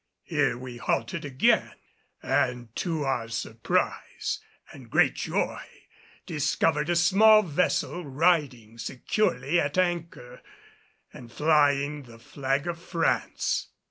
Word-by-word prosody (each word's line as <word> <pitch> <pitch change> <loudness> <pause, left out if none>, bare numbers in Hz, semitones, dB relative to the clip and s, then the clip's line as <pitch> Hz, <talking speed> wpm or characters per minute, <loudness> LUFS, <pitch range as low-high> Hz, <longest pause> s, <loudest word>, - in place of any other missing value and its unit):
Here - - 0
we 125 -1 -8
halted 115 0 -2
again, 135 -2 +2 0.5
and 120 -2 -1
to 165 -4 -2
our 130 -4 -1
surprise 110 0 -2 0.3
and - - -13
great - - +3
joy - - -2 0.6
discovered 150 0 0
a 175 - +2
small 215 +5 +6
vessel 180 +1 -1
riding 140 -7 0
securely 150 - 0
at 145 +1 -1
anchor, 170 -9 -2 0.7
and 120 -2 -12
flying 145 0 +2
the 120 -4 -14
flag 135 +4 -2
of 170 -1 -4
France! 170 -2 -1
145 Hz, 110 wpm, -27 LUFS, 125-170 Hz, 0.7 s, small